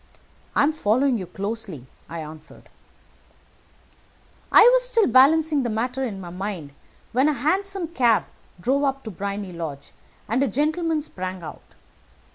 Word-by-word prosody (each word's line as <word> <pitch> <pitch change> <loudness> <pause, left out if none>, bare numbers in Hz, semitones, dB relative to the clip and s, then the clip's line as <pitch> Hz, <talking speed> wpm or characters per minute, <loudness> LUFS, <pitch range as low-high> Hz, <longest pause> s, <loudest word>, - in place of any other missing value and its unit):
"I - - +4
am 290 - +3
following 255 -2 +1
you 185 - -6
closely," 200 - -5 0.2
I 165 0 -5
answered. 155 +1 -10 1.8
"I - - +9
was - - +4
still 455 -4 +3
balancing 295 +4 +5
the 240 - -1
matter 250 +4 -2
in 210 -7 -4
my 175 -2 -8
mind, 180 -5 -5 0.4
when 260 +5 +3
a - - +1
hansom 370 +7 -1
cab 240 -9 +3 0.3
drove 270 +9 +1
up 275 -1 -1
to 220 - -6
Briony 200 0 -5
Lodge, 155 -5 -7 0.4
and 235 +4 +1
a 275 - +3
gentleman 310 - 0
sprung 185 - -6
out. - - -11
235 Hz, 145 wpm, -23 LUFS, 190-290 Hz, 1.8 s, I